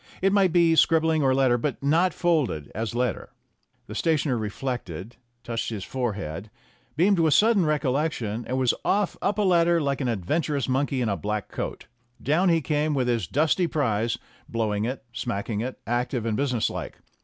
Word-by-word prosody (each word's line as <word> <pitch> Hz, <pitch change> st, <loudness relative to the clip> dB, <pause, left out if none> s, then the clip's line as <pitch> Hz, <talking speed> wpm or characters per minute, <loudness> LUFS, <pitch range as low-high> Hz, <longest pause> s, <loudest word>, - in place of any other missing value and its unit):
It 195 Hz, +1 st, +2 dB
might 195 Hz, -3 st, +4 dB
be 170 Hz, -1 st, +4 dB
scribbling 160 Hz, -1 st, +3 dB
or 135 Hz, -2 st, +3 dB
letter 130 Hz, -3 st, +3 dB
but 140 Hz, +2 st, -3 dB
not 165 Hz, +6 st, +3 dB
folded 150 Hz, -, 0 dB
as 115 Hz, +2 st, -3 dB
letter." 125 Hz, -3 st, -1 dB, 0.6 s
The -, -, -9 dB
stationer 155 Hz, -5 st, +1 dB
reflected, 110 Hz, -3 st, -4 dB, 0.3 s
touched 115 Hz, -1 st, -3 dB
his 105 Hz, -4 st, -5 dB
forehead, 105 Hz, -7 st, -4 dB, 0.5 s
beamed 190 Hz, +3 st, +4 dB
with 160 Hz, -3 st, +4 dB
sudden 210 Hz, -6 st, +4 dB
recollection, 135 Hz, -6 st, -1 dB
and 130 Hz, -, -1 dB
was 130 Hz, -2 st, +3 dB
off 205 Hz, -2 st, +1 dB
up 200 Hz, 0 st, 0 dB
a 210 Hz, -, +2 dB
ladder 170 Hz, -2 st, +4 dB
like 140 Hz, -2 st, -1 dB
an 130 Hz, -, 0 dB
adventurous 135 Hz, -, -1 dB
monkey 135 Hz, 0 st, 0 dB
in 115 Hz, -, 0 dB
a 100 Hz, -, 0 dB
black 105 Hz, +3 st, -3 dB
coat. -, -, -5 dB, 0.3 s
Down 170 Hz, +7 st, +2 dB
he 165 Hz, -1 st, +3 dB
came 150 Hz, +2 st, 0 dB
with 130 Hz, -2 st, 0 dB
his 115 Hz, -7 st, 0 dB
dusty 160 Hz, -, +2 dB
prize, 115 Hz, -7 st, 0 dB, 0.3 s
blowing 110 Hz, -2 st, -1 dB
it, 125 Hz, -1 st, -4 dB
smacking 110 Hz, -2 st, -3 dB
it, 125 Hz, +2 st, -4 dB
active 120 Hz, 0 st, -1 dB
and 110 Hz, -2 st, 0 dB
business 125 Hz, -3 st, 0 dB
like. -, -, -6 dB
130 Hz, 175 wpm, -25 LUFS, 115-160 Hz, 0.6 s, might